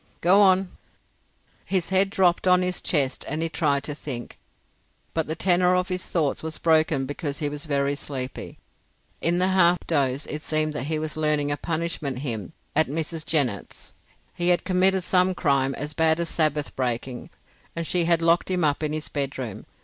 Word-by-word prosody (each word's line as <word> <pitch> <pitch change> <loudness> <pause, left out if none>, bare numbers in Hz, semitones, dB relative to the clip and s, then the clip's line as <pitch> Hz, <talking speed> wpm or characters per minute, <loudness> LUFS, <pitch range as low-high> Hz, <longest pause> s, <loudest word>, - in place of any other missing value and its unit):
"Go 190 +4 +5
on." 190 -1 +4 0.9
His 185 -3 -1
head 190 +1 +3
dropped 185 -2 +2
on 180 0 +5
his 180 0 -2
chest 140 -6 0
and 155 +3 -2
he 165 - -1
tried 145 -4 0
to 150 - -4
think, 130 -5 -7 0.7
but 160 -1 -1
the 160 - -3
tenor 180 +1 +3
of 180 +1 0
his 185 0 -2
thoughts 155 -5 0
was 160 0 -4
broken 155 -4 +2
because 145 +1 -4
he 150 - -1
was 145 +2 -5
very 140 -1 +1
sleepy. 135 -2 -6 0.6
In 170 +1 +1
the 185 +1 +2
half 180 -2 +3
doze 140 -3 0
it 150 - -5
seemed 155 0 0
that 145 - -4
he 155 +1 -1
was 155 0 -4
learning 150 -2 +1
a - - +1
punishment 160 -4 -3
hymn 125 -1 -5 0.2
at 155 +1 +3
Mrs. 160 +2 -3
Jennett's. 130 -10 -1 0.4
He 175 - -2
had 175 -1 +3
committed 185 0 +2
some 185 0 +2
crime 135 -5 +1
as 150 +1 -5
bad 160 0 +2
as 170 -1 -2
Sabbath 150 -2 0
breaking, 125 0 -3 0.5
and 165 0 -3
she 175 +1 +1
had 170 -1 +3
locked 170 +2 +3
him 180 -2 0
up 145 -1 +1
in 155 -1 -2
his 155 0 -3
bedroom. 135 -6 -4
155 Hz, 185 wpm, -25 LUFS, 145-175 Hz, 0.9 s, Go